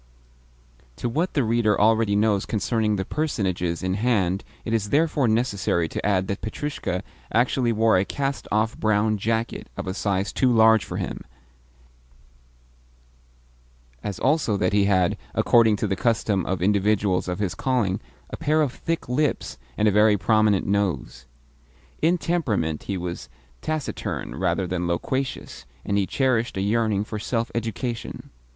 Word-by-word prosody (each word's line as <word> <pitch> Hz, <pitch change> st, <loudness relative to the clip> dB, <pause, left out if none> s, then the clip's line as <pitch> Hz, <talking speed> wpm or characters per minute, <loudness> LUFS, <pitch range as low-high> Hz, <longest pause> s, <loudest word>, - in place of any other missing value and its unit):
To 120 Hz, -, -3 dB
what 160 Hz, +10 st, -1 dB
the 140 Hz, -, +3 dB
reader 110 Hz, -2 st, +2 dB
already 110 Hz, -1 st, +3 dB
knows 105 Hz, -1 st, +2 dB
concerning 110 Hz, 0 st, 0 dB
the 95 Hz, -1 st, -2 dB
personages 95 Hz, -, -1 dB
in 95 Hz, 0 st, 0 dB
hand 100 Hz, -4 st, +1 dB, 0.2 s
it 115 Hz, -, -2 dB
is 105 Hz, -3 st, 0 dB
therefore 150 Hz, -1 st, +2 dB
necessary 105 Hz, -7 st, +1 dB
to -, -, -5 dB
add 95 Hz, -2 st, +1 dB
that 100 Hz, -, -3 dB
Petrushka 110 Hz, -5 st, -3 dB, 0.3 s
usually 120 Hz, 0 st, +2 dB
wore 110 Hz, -3 st, +3 dB
a -, -, +2 dB
cast 140 Hz, +5 st, -3 dB
off 110 Hz, +2 st, +1 dB
brown 110 Hz, 0 st, +1 dB
jacket 115 Hz, +2 st, -2 dB
of -, -, -4 dB
a 95 Hz, -, -3 dB
size 100 Hz, -1 st, -1 dB
too 130 Hz, -2 st, +2 dB
large 110 Hz, -2 st, +5 dB
for -, -, -6 dB
him, -, -, -4 dB, 2.8 s
as 100 Hz, -2 st, -4 dB
also 130 Hz, -6 st, +1 dB
that 90 Hz, 0 st, 0 dB
he 100 Hz, -1 st, +4 dB
had 95 Hz, -3 st, +2 dB, 0.2 s
(according 115 Hz, -3 st, +4 dB
to 105 Hz, -, -2 dB
the 100 Hz, -2 st, 0 dB
custom 105 Hz, -2 st, 0 dB
of 90 Hz, -2 st, -1 dB
individuals 100 Hz, -1 st, +2 dB
of 90 Hz, -, -2 dB
his 100 Hz, -3 st, -1 dB
calling) 120 Hz, -8 st, 0 dB, 0.3 s
a -, -, -5 dB
pair 155 Hz, +1 st, +2 dB
of 135 Hz, -4 st, -2 dB
thick 165 Hz, 0 st, -3 dB
lips 125 Hz, -, -1 dB, 0.2 s
and 105 Hz, -, +3 dB
a -, -, +5 dB
very 105 Hz, +1 st, +4 dB
prominent 110 Hz, -1 st, +2 dB
nose. 100 Hz, -10 st, -1 dB, 0.7 s
In 170 Hz, +3 st, +3 dB
temperament 110 Hz, -, -1 dB
he 100 Hz, -, -1 dB
was 85 Hz, -1 st, -5 dB, 0.3 s
taciturn 155 Hz, -3 st, -3 dB
rather 95 Hz, -, 0 dB
than 90 Hz, -1 st, -2 dB
loquacious, 85 Hz, -, -3 dB, 0.2 s
and 100 Hz, -, 0 dB
he 100 Hz, -2 st, +1 dB
cherished 125 Hz, -6 st, 0 dB
a -, -, 0 dB
yearning 105 Hz, 0 st, +1 dB
for 105 Hz, 0 st, -5 dB
self 115 Hz, +2 st, -2 dB
education. 115 Hz, +1 st, -4 dB
105 Hz, 155 wpm, -24 LUFS, 95-120 Hz, 2.8 s, large